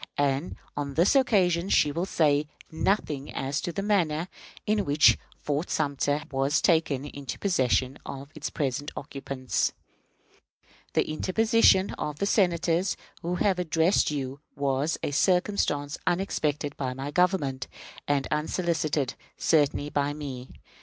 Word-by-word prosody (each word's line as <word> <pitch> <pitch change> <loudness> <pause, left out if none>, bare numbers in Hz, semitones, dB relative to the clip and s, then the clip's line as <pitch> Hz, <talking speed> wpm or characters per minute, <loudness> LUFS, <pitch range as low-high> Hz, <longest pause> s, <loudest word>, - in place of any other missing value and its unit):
And 145 +3 0 0.2
on 140 -1 -4
this 175 - +4
occasion 190 -9 +3
she 150 - +4
will 170 +5 -2
say 150 -4 +2 0.2
nothing 160 -4 -1
as 135 +2 -2
to 175 - -3
the 195 +3 -3
manner 175 -5 +1 0.4
in 210 -1 +1
which 145 -2 +5 0.2
Fort 150 +4 -2
Sumter 145 0 0
was 135 +2 +2
taken 160 -5 +2
into 140 -2 -6
the - - -18
possession 130 -7 +1
of 140 +1 -8
its 155 - -4
present 145 0 -2
occupants. 135 -2 -2 1.2
The - - +2
interposition 195 +4 +3
of 150 -1 -3
the 200 - 0
Senators 175 -2 +2 0.2
who 175 +2 -2
have 185 0 +1
addressed 165 +2 +2
you 140 -2 -4 0.2
was 140 +2 0
a - - -1
circumstance 165 -3 +1
unexpected 150 -6 0
by 130 -2 -3
my 135 +2 -5
government, 150 -7 +1 0.4
and 140 -2 +1
unsolicited 155 -3 0 0.2
certainly 145 -2 +2
by 145 0 0
me. 135 -4 -6
150 Hz, 135 wpm, -27 LUFS, 140-175 Hz, 1.2 s, which